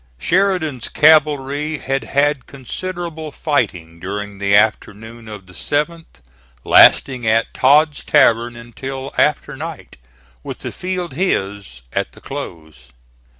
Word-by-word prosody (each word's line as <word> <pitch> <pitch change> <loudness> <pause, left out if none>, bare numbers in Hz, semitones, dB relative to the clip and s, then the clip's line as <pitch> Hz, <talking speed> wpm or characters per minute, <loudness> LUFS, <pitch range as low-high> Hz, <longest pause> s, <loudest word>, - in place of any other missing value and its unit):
Sheridan's 170 - 0
cavalry 150 -1 +3
had 135 -1 -3
had 140 -1 0
considerable 160 +3 -6
fighting 90 - -2
during 100 +2 -6
the 100 0 +2
afternoon 110 +2 0
of 105 -3 -9
the 90 - -17
7th, 150 - -3 0.4
lasting 125 -4 +5
at 115 +1 +1
Todd's 145 +3 +3
Tavern 120 +1 +3
until 130 +3 -7
after 150 -2 +1
night, 160 +2 -8 0.4
with - - -8
the - - -3
field 180 -4 -4
his 100 - -2
at - - -2
the - - -15
close. 80 -5 -9
135 Hz, 115 wpm, -18 LUFS, 105-155 Hz, 0.4 s, lasting